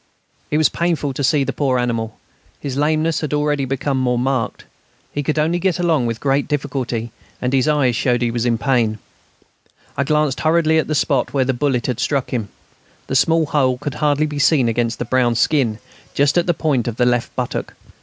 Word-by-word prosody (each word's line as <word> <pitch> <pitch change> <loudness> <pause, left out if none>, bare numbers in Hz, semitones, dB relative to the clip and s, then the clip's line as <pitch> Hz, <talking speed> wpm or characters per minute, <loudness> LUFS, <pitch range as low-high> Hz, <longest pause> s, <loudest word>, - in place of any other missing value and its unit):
It 150 - +1
was 155 -2 +5
painful 165 -5 -1
to 140 - -3
see 140 +1 +3
the - - -3
poor 135 -3 +1
animal; 115 -2 -2 0.4
his 135 -2 -4
lameness 155 +3 +1
had 150 -1 -1
already 150 -2 0
become 135 +1 -1
more 125 -1 +1
marked. 130 -1 -1 0.5
He 145 - -2
could 150 +2 -2
only 160 +3 +1
get 185 -1 0
along 165 -8 +1
with 115 -1 -3
great 140 +2 +1
difficulty, 130 -5 -3 0.3
and 125 +1 -2
his 130 0 +2
eyes 140 -5 +2
showed 120 0 +1
he 120 - 0
was 120 -1 -1
in 120 -1 +1
pain. 120 -4 +1 1.0
I 140 - +1
glanced 150 -1 +1
hurriedly 160 0 +3
at - - -1
the 155 - -1
spot 140 -2 0
where 130 -2 +2
the 130 - +1
bullet 130 -1 0
had 125 -3 -2
struck 140 -3 -1
him. 110 -6 -2 0.6
The 135 - -3
small 165 +4 +3
hole 130 -4 +1
could 145 +1 -4
hardly 150 0 +2
be 150 -1 -4
seen 135 -2 +3
against 115 0 0
the 120 - -3
brown 120 -1 +2
skin, 120 -3 +1 0.4
just 140 +2 +2
at 175 0 +2
the 175 - +2
point 140 -8 0
of 120 - -2
the 125 - +2
left 120 -1 0
buttock. - - -3
135 Hz, 205 wpm, -19 LUFS, 125-150 Hz, 1.0 s, was